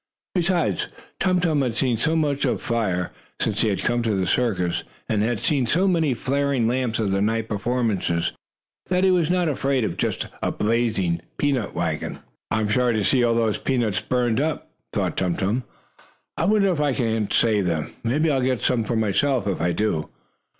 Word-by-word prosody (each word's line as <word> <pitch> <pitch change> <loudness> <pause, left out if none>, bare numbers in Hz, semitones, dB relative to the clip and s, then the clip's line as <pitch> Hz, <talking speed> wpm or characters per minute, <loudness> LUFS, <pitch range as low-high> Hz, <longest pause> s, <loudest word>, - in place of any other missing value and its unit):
Besides, 170 - +1 0.3
Tum 185 -1 +2
Tum 160 -5 +2
had 125 -4 -1
seen 125 0 +1
so 160 +8 0
much 145 -3 +1
of - - +1
fire, 100 -7 -1 0.3
since 105 -2 0
he 115 - +3
had 95 -2 -1
come 120 0 +1
to 110 -3 0
the 95 -1 0
circus, 90 -5 0 0.2
and 105 -2 +1
had 115 0 0
seen 135 -1 +1
so 180 +11 +2
many 160 -8 +2
flaring 135 -1 0
lamps 125 -2 0
at 105 -3 0
the 95 0 +1
night 110 +2 0
performances, 105 -6 0 0.6
that 180 0 +1
he 190 - +5
was 170 -3 +2
not 180 -1 +2
afraid 135 -3 0
of 95 - -2
just - - -1 0.2
a - - 0
blazing 105 -7 0 0.2
peanut 135 -7 0
wagon. - - -2 0.3
"I'm 110 -1 0
sorry 125 0 +2
to 110 - +1
see 125 +4 +3
all 115 -1 +3
those 115 -2 +1
peanuts 120 -7 0
burned 125 -1 +1
up," 155 +1 -2 0.2
thought - - -1
Tum 90 -2 0
Tum. 110 +6 -1 0.7
"I 165 - 0
wonder 200 0 +3
if 160 -4 -1
I 145 -2 +2
can't 115 -4 -1
save 105 -5 +2
them 80 -3 -1
maybe 150 +7 +2
I'll 135 -2 +1
get 125 -3 0
some 120 -3 +1
for 115 +2 -2
myself, 110 +3 +1
if 100 -4 -1
I 85 +1 +2
do." 85 -6 -1
120 Hz, 190 wpm, -23 LUFS, 105-140 Hz, 0.7 s, he